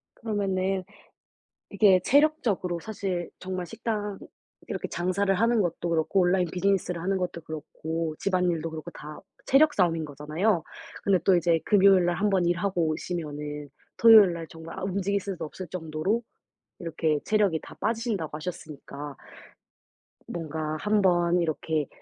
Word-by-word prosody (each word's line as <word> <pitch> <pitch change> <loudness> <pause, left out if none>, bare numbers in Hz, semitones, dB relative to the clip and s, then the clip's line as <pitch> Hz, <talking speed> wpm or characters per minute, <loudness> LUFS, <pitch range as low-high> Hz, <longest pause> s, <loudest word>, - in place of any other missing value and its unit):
그러면은 195 -3 -1 0.9
이게 195 -2 +5
체력적으로 245 - +2
사실 190 -4 -4
정말 185 -1 -4
식당 210 -1 -3 0.5
이렇게 - - -4
장사를 185 +3 0
하는 230 +3 +2
것도 175 -1 -1
그렇고 165 +4 +2
온라인 180 0 +3
비즈니스를 180 -2 0
하는 195 +1 0
것도 175 -2 -4
그렇고 160 +1 -4
집안일도 180 -4 0
그렇고 160 -1 -7
다 150 +1 -9 0.3
체력 295 +3 +5
싸움인 165 -4 +2
거잖아요. 155 +6 -1 0.4
근데 195 -2 +4
또 190 -2 +5
이제 170 -1 +2
금요일 195 -3 +5
날 175 -1 +1
1 205 +3 +1
번 185 -3 +2
일하고 175 -1 +1
오시면은 150 -3 -4 0.3
토요일 220 -6 +8
날 165 -1 -6
정말 160 0 -10
아 - - -5
움직일 200 +1 -1
수도 190 -4 -5
없을 180 +4 -7
정도로 175 +7 -2 0.6
이렇게 160 -3 -1
체력이 205 -7 +2
다 - - -11
빠지신다고 210 -8 -2
하셨으니까 150 -4 -7 1.1
뭔가 155 -2 -4
한번 180 -4 +3
이렇게 155 -2 -1
180 Hz, 325 characters per minute, -27 LUFS, 160-200 Hz, 1.1 s, 토요일